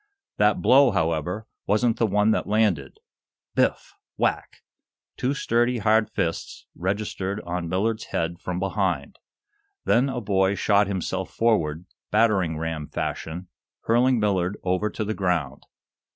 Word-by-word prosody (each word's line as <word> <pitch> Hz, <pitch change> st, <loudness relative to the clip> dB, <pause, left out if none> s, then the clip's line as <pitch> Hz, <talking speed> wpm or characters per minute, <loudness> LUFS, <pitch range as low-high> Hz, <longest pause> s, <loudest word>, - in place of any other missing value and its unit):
That 105 Hz, -4 st, +2 dB
blow, 135 Hz, 0 st, +6 dB
however, 90 Hz, +1 st, -1 dB, 0.2 s
wasn't 110 Hz, +3 st, +2 dB
the 115 Hz, -, +3 dB
one 105 Hz, +2 st, +3 dB
that -, -, 0 dB
landed. 100 Hz, -11 st, +1 dB, 0.6 s
Biff! -, -, 0 dB, 0.2 s
whack! -, -, -1 dB, 0.5 s
Two 135 Hz, +3 st, -1 dB
sturdy, 120 Hz, -1 st, +1 dB
hard 110 Hz, 0 st, +2 dB
fists 85 Hz, -4 st, -3 dB
registered 100 Hz, +1 st, -3 dB
on 85 Hz, -1 st, -4 dB
Millard's 110 Hz, +5 st, -1 dB
head 85 Hz, +1 st, -3 dB
from 90 Hz, -1 st, -4 dB
behind. 95 Hz, -6 st, -2 dB, 0.7 s
Then 125 Hz, +4 st, +3 dB
a 130 Hz, -2 st, -3 dB
boy 95 Hz, -2 st, +1 dB
shot 100 Hz, 0 st, +3 dB
himself 95 Hz, -1 st, -3 dB
forward, 90 Hz, -8 st, +1 dB, 0.2 s
battering 100 Hz, -7 st, +2 dB
ram 80 Hz, -2 st, -4 dB
fashion, 85 Hz, +3 st, -4 dB, 0.3 s
hurling 120 Hz, +2 st, +3 dB
Millard 100 Hz, -2 st, 0 dB
over 95 Hz, +3 st, 0 dB
to 105 Hz, -, -4 dB
the 110 Hz, -, -2 dB
ground. 85 Hz, -9 st, -2 dB
100 Hz, 130 wpm, -24 LUFS, 90-110 Hz, 0.7 s, blow